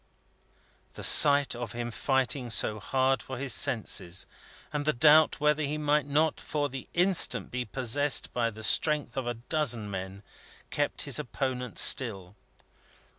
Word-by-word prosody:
The - - -9
sight 145 -1 +6
of 120 -3 -7
him 120 0 -6
fighting 130 0 -2
so 110 -1 +1
hard 130 +5 -1
for 130 - -9
his 135 -2 -2
senses, 95 -7 +1 0.5
and 150 -1 -3
the 155 +1 0
doubt 150 +5 +4
whether 150 +1 0
he 150 +1 -3
might 150 -1 -1
not 150 +2 -1
for 145 -1 -3
the 135 -1 -9
instant 180 +1 +2
be 125 0 -4
possessed 135 +5 0
by 120 -1 -1
the 110 0 -10
strength 145 +2 +1
of 130 -2 -4
a 120 - -3
dozen 120 -4 -3
men, 95 +1 -8 0.5
kept - - -3
his - - -2
opponent 125 -6 -5
still. 100 -6 +3
130 Hz, 150 wpm, -27 LUFS, 115-145 Hz, 0.5 s, sight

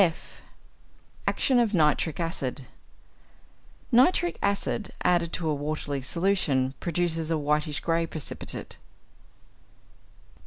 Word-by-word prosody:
(f) 170 -4 -1 0.9
=Action 255 -2 +3
of 220 -4 +2
Nitric 155 0 +2
Acid.= 140 -6 -2 1.3
Nitric 350 +8 +4
acid 200 +1 -1
added 175 -2 +2
to 165 - -2
a 155 - +2
watery 145 -1 -3
solution 145 -4 +1
produces 165 -2 -1
a 165 - +1
whitish 150 0 0
grey 165 0 +1
precipitate. 155 -4 -4
165 Hz, 95 wpm, -27 LUFS, 150-180 Hz, 1.3 s, Nitric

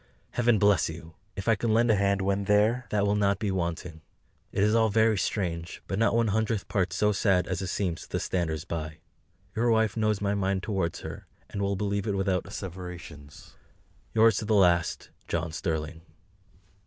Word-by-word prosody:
Heaven 120 -2 +3
bless 100 -3 +3
you! 80 0 -9 0.2
If 100 - -6
I 115 - +5
can 110 +1 0
lend 115 0 +4
a - - +4
hand 100 -1 +1
when 100 +1 0
THERE, 110 +5 +2
that 105 -1 +1
will 100 - +2
not 100 -1 +2
be 105 -1 -1
wanting. 85 -2 -3 0.5
It 100 - +1
is 105 +1 +3
all 110 -1 +4
very 110 +1 +3
strange, 90 -4 -3
but 95 - -2
not 115 - +3
one 115 -1 +2
hundredth 110 0 0
part 95 -3 0
so 105 0 +2
sad 95 -3 +2
as 90 0 -2
it 95 - -3
seems 90 -2 -2
to - - -12
the - - -1
standers 80 -3 -2
by. 80 -3 -5 0.6
Your 120 +2 +1
Wife 110 -2 +2
knows 110 -2 +1
my 100 0 0
mind 95 -1 0
towards 95 -6 -2
her, - - -8 0.2
and 100 - -4
will 100 0 0
believe 100 +1 -2
it 100 -2 0
without 95 -2 0
asseverations. 90 -7 -9 0.6
Yours 110 -2 +5
to - - -2
the 110 0 +2
last, 90 -4 +2 0.2
JOHN 85 -1 -2
STERLING. 80 -1 -3
100 Hz, 190 wpm, -28 LUFS, 90-105 Hz, 0.6 s, I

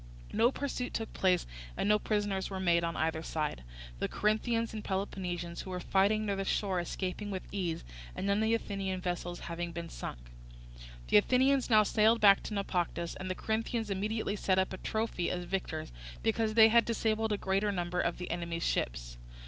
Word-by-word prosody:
No 230 +4 +4
pursuit 270 -3 -3
took 225 - -3
place, 185 -2 +2 0.3
and - - 0
no 210 0 +5
prisoners 205 -3 -1
were 190 -1 -4
made 170 -2 +3
on 165 0 -1
either 160 0 0
side; 155 - -3 0.4
the - - 0
Corinthians 230 +2 0
and 215 -1 -5
Peloponnesians 180 -3 -3
who - - -8
were 180 -1 -3
fighting 200 +4 +2
near 200 -1 0
the 195 - -2
shore 190 -1 0
escaping 185 +4 -3
with 190 -2 -4
ease, 180 -5 -2 0.3
and - - -3
none 200 0 +2
of - - +1
the 225 +1 +3
Athenian 195 -4 -3
vessels 175 -1 -3
having 170 0 -4
been 170 0 -6
sunk. - - -6 0.9
The - - +7
Athenians 260 - +3
now 215 -2 +7
sailed 220 +2 +4
back 200 -2 +7
to 215 - -4
Naupactus, 175 -3 -1
and 185 0 -4
the 185 - -1
Corinthians 225 0 -2
immediately 210 +2 -1
set 190 -2 +1
up 190 0 +1
a - - -4
trophy 220 -4 -1
as 180 0 -2
victors, 175 - -3 0.3
because 220 -1 +1
they 225 -1 +8
had 235 +1 +6
disabled 220 -1 0
a 210 - +1
greater 195 +2 +1
number 180 -1 -1
of 170 - -1
the 180 - -5
enemy's 170 -1 -3
ships. - - -2
195 Hz, 190 wpm, -32 LUFS, 175-215 Hz, 0.9 s, they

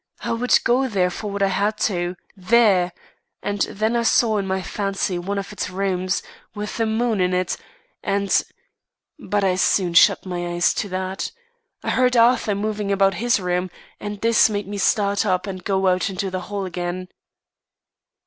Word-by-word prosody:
I - - -3
would 235 +2 +3
go 255 +3 +2
there 185 -6 +1
for 210 +3 -5
what 200 0 -1
I 195 - +3
had 205 +3 0
to 215 - +1
do; 175 0 -2 0.2
there! 195 -2 +3 0.5
And 205 -1 -2
then 220 +3 -1
I 235 - +2
saw 225 -2 +3
in 195 - -3
my 190 0 -1
fancy 195 -2 -2
one 200 +3 -3
of 200 +1 -5
its 205 - -3
rooms, 185 0 -1 0.3
with 210 0 -5
the 225 -1 +1
moon 220 -2 0
in 180 0 +1
it, 180 -1 0 0.5
and 200 0 +1 0.8
but 205 -1 -1
I 190 -1 +3
soon 185 -2 +2
shut 170 - +5
my 175 -1 -3
eyes 175 0 +2
to 205 - -3
that. 185 +1 -3 0.5
I - - -1
heard 250 -1 +2
Arthur 230 -3 +4
moving 210 0 -2
about 195 0 +3
his 235 +5 +1
room, 180 0 -1 0.3
and 205 -1 -6
this 230 -1 +4
made 205 -2 -3
me 205 0 -5
start 200 0 +2
up 185 +1 0
and 185 -2 -6
go 195 0 0
out 185 0 +2
into 190 0 -3
the 185 0 -3
hall 200 -1 -3
again." 180 0 -4
195 Hz, 185 wpm, -22 LUFS, 185-210 Hz, 0.8 s, shut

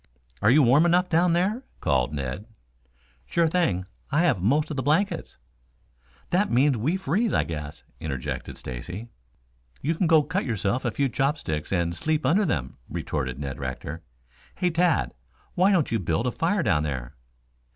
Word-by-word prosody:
"Are 110 - +4
you 145 +4 +6
warm 140 +7 +5
enough 180 +1 +3
down 170 +1 +3
there?" 195 +8 +1 0.2
called 65 -1 +1
Ned. 70 - -4 0.8
"Sure 170 -1 +2
thing. 155 - +1 0.3
I 150 +3 +3
have 140 - +2
most 145 - +2
of - - -3
the - - +1
blankets." 155 +9 0 0.9
"That 195 +4 +2
means 135 +3 +3
we 145 - 0
freeze, 190 - 0
I 75 - +3
guess," 75 -2 -6 0.2
interjected 65 -3 -4
Stacy. 90 - -7 0.7
"You 155 +5 0
can 170 +2 0
go 160 -2 +5
cut 180 +7 -1
yourself 115 +2 -1
a - - +2
few 140 +5 0
chopsticks 135 - -1
and 85 -2 +1
sleep 155 - -1
under 185 +10 +3
them," 70 - -2
retorted 65 0 -3
Ned 70 -1 -5
Rector. 70 +4 -5 0.5
"Hey, 180 -1 +1
Tad, 165 - +2 0.4
why 185 +3 +4
don't 170 -10 +2
you 115 - +1
build 85 +4 -1
a 125 - +1
fire 175 +6 0
down 85 - +2
there?" 65 -5 -4
130 Hz, 165 wpm, -25 LUFS, -, 0.9 s, you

